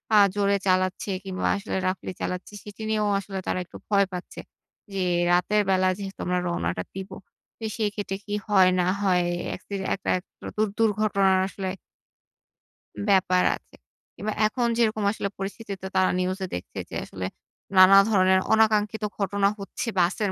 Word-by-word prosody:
আ - - +8 0.2
জোরে 200 0 +2
চালাচ্ছে 185 +2 +1
কিংবা 190 -1 -2
আসলে 200 +2 -4
roughly 185 0 -2
চালাচ্ছে, 180 +3 -4
সেটি 210 +1 -11
নিয়েও 215 -1 +1
আসলে 195 0 -7
তারা - - 0
একটু - - -12
ভয় 200 -1 +4
পাচ্ছে 180 0 -7 0.5
জি, 195 - -2 0.3
রাতের 205 +4 +3
বেলা 185 0 +3
যেহেতু 195 -1 -7
আমরা 180 0 +1
রওনাটা 90 - -2
দিব। 190 0 -6 0.5
তো - - -10
সেই 215 -2 +1
ক্ষেত্রে 195 -2 -3
কি 205 - -5 0.2
হয় 190 -3 +6
না 180 - +2
হয় 180 -3 +3 0.3
একসিডে 195 +1 -6
একটা 195 - -6
একটা 180 - -23
দু - - -5
দু 215 - +2 0.2
দুর্ঘটনার 200 -3 +3
আসলে 190 -1 -4 1.4
ব্যাপার 185 -2 +4
আছে। - - -18 0.4
কিংবা 215 +1 -3
এখন 240 +2 -1
যেরকম 220 -2 +1
আসলে 200 -2 -3
পরিস্থিতিতে 200 +1 -5
তো 190 - -3
তারা 185 - +4
নিউজ 185 +1 -1 0.2
দেখছে 90 - -7
যে - - -7
আসলে 95 -1 -6 0.5
নানা 185 +1 +9
ধরনের 190 -2 +4
অনাকাঙ্ক্ষিত 220 0 +2
ঘটনা 200 0 +1
হচ্ছে 200 +4 -5
বাসের 195 +3 +1
195 Hz, 160 wpm, -25 LUFS, 185-210 Hz, 1.4 s, নানা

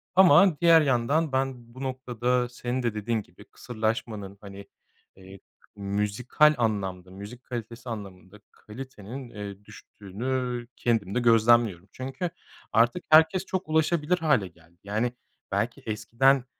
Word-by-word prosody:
Ama 180 -2 +6
diğer 165 -2 +7
yandan 140 +3 +1
ben 130 -3 -2
bu 130 - -7
noktada 125 -1 -1
senin 125 +1 -3
de 115 -3 0
dediğin 110 +1 -1
gibi - - -17
kısırlaşmanın 110 -3 -4
hani, 100 0 -10 0.5
eee, 95 0 -13 0.4
müzikal 105 +9 +2
anlamda 95 -5 -2
müzik 100 +6 -10
kalitesi 120 0 -7
anlamında 100 -2 -9
kalitenin, 125 +1 -9
eee, 100 -2 -8
düştüğünü 120 +5 -5
kendim 110 -4 0
de - - +3
gözlemliyorum. 115 -5 +3
Çünkü 135 +7 -4 0.4
artık 120 +11 +3
herkes 160 +4 +5
çok 185 -4 -4
ulaşabilir 160 +2 +2
hâle 145 - +2
geldi. 85 0 -22
Yani 110 +4 -1 0.4
belki 105 +4 -1
eskiden 120 +5 +2
120 Hz, 125 wpm, -26 LUFS, 105-130 Hz, 0.5 s, diğer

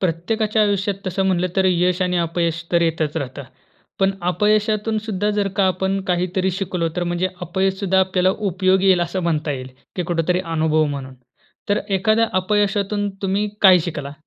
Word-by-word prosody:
प्रत्येकाच्या 210 +5 0
आयुष्यात 200 -1 +1
तसं 190 +1 0
म्हटलं 185 -1 +1
तर 190 - +3
यश 180 0 +2
आणि 180 0 0
अपयश 170 0 -1
तर 170 -1 +4
येतचं 160 -1 0
राहतं. 135 +1 -6 0.6
पण 195 0 +3
अपयशातून 210 +4 +1
सुद्धा 205 -1 -1
जर 200 -1 +1
का 195 - +3
आपण 190 +1 0
काहीतरी 180 +1 0
शिकलो, 180 -2 -2
तर 180 - 0
म्हणजे 175 +1 -1
अपयश 190 +2 -1
सुद्धा 190 -1 +2
आपल्याला 185 0 +2 0.2
उपयोगी 185 +1 +2
येईल 185 -2 +5
असं 175 +2 -2
म्हणता 155 -3 0
येईल 130 -1 -6 0.3
की 180 - 0
कुठेतरी 175 +1 0
अनुभव 160 -1 +1
म्हणून. 140 -3 -5 0.5
तर 205 - +2
एखाद्या 215 +4 +2
अपयशातून 205 +1 0
तुम्ही 200 +2 0
काय 190 -2 +8
शिकला? 145 -5 -5
185 Hz, 165 wpm, -20 LUFS, 170-195 Hz, 0.6 s, काय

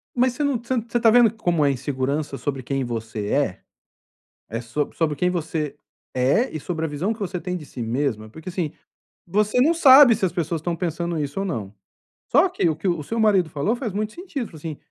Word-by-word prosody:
Mas 250 0 +3
você 295 - -2
não 285 -3 +1
você 235 +2 -3
não 235 - +1
tá 230 -1 +3
vendo 240 -2 +6
como 175 -9 +1
é 140 - +4
insegurança 140 +2 -2
sobre 135 -2 -3
quem 135 +2 -1
você 110 -3 -4
é? 140 -9 0 0.9
É 115 +1 -3
sobre 125 +5 -3
sobre 155 -3 0
quem 180 +6 +1
você 160 -4 -2 0.4
é 135 - +2
e - - -2
sobre 160 +1 -3
a - - -1
visão 160 +9 -1
que 225 - -14
você 185 -3 -3
tem 180 +1 -4
de 155 - -10
si 125 - -8
mesma? 115 -2 -2
Porque 160 +10 -9
assim, 170 -4 -2 0.5
você 210 +6 +1
não 315 +6 +4
sabe 275 -6 +8
se 200 - 0
as 180 - 0
pessoas 165 -1 -2
estão 170 +1 -2
pensando 170 0 -2
isso 145 +4 -3
ou 195 - -1
não, 110 - -4 0.6
só 295 +9 +5
que 265 - 0
o 155 - 0
que 165 +5 -4
o 170 -4 0
seu 230 +10 -3
marido 195 -7 +3
falou 155 +12 0
faz 240 -3 -4
muito 210 +2 -2
sentido. 340 -8 -5
Falou 160 - -13
assim, 155 -1 -6
170 Hz, 225 wpm, -23 LUFS, 140-220 Hz, 0.9 s, sabe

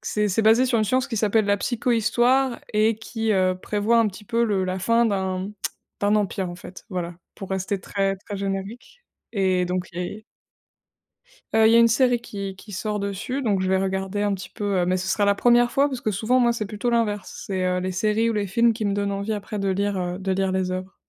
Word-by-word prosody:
C'est 210 -1 -1
c'est 190 - +1
basé 225 +4 +5
sur 245 -3 +1
une 215 - +2
science 255 +5 +1
qui 230 - -4
s'appelle 215 +1 +2
la 200 0 +2
psychohistoire 240 +3 +1
et 215 +1 +3
qui, 225 0 -3
heu, 185 -2 +2
prévoit 210 +3 +1
un 225 -2 +4
petit 210 +2 -11
peu 235 +3 0
le 200 -4 0
la 185 +1 -2
fin 230 +5 +3
d'un 190 -2 -1 0.5
d'un 205 +1 +3
empire 195 -2 -1
en 175 - -7
fait 180 +1 -11
voilà 175 -3 -4 0.2
pour 195 - -9
rester 190 +1 -1
très, 195 0 -1
très 200 +1 -8
générique. 200 - -5 0.3
Et 190 -4 +1
donc 180 0 -2
i 180 +5 -5 1.3
Heu, 220 0 +6
il - - +5
y - - +6
a - - +7
une 230 0 +6
série 245 +1 +3
qui 200 -4 -6
qui 205 +3 -13
sort 210 +2 -3
dessus 200 +7 -3
donc 205 -7 +1
je 185 - 0
vais 190 - +2
regarder 190 +1 -2
un 205 -1 +1
petit 190 - -6
peu, 200 -2 -1
heu, 175 - +2
mais 185 +1 +1
ce 185 +1 -3
sera 205 - +2
la 200 0 +3
1re 240 +2 +4
fois 280 +4 +2
parce 260 -3 -4
que 215 - -1
souvent 225 +6 +1
moi 240 -1 +3
c'est 220 -2 -3
plutôt 210 +3 -3
l'inverse. 210 -5 -1
C'est, 185 -2 -1
heu, 180 0 +1
les 185 - -2
séries 215 +4 +1
ou - - -1
les 205 -2 -1
films 230 +5 +3
qui 220 -1 -3
me 200 - +1
donnent 200 0 -1
envie 200 +2 -2
après 205 0 -5
de 195 - -1
lire, 200 +1 0
heu, 180 -1 -2
de 190 0 -2
lire 190 0 0
les 185 -1 0
œuvres. 185 +1 -5
205 Hz, 240 wpm, -24 LUFS, 190-225 Hz, 1.3 s, a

